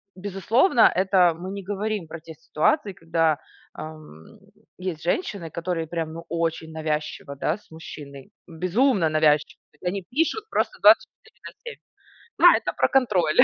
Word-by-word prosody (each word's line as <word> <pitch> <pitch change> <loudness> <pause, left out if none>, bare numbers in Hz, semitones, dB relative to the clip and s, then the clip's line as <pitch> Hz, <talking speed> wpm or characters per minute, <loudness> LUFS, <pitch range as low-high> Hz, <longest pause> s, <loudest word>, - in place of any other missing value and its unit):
безусловно, 205 - +3
это 185 -2 +4
мы 185 +2 -6
не 200 -1 -6
говорим 205 -2 -3
про 165 +1 -8
те 160 0 -11
ситуации, 195 - 0
когда, 165 -2 0 0.3
ам, 155 - -11 0.4
есть 180 -4 -4
женщины, 195 - -2
которые 170 0 -3
прям 165 -1 -3
ну 165 +1 -9
очень 165 -1 -2
навязчиво, 150 -2 -4
да, 155 +6 -1
с 210 - -27
мужчиной, 140 -4 -10 0.2
безумно 185 - +1
навязчивы. 155 -1 +2 0.2
Вот 180 - -4
они 195 0 -4
пишут 325 - 0
просто - - -1
24 - - +3
на - - -11
7.. 475 - -8 0.6
Да, - - +7
это - - -4
про - - +3
контроль. 190 -12 +2
170 Hz, 145 wpm, -24 LUFS, 160-200 Hz, 0.6 s, Да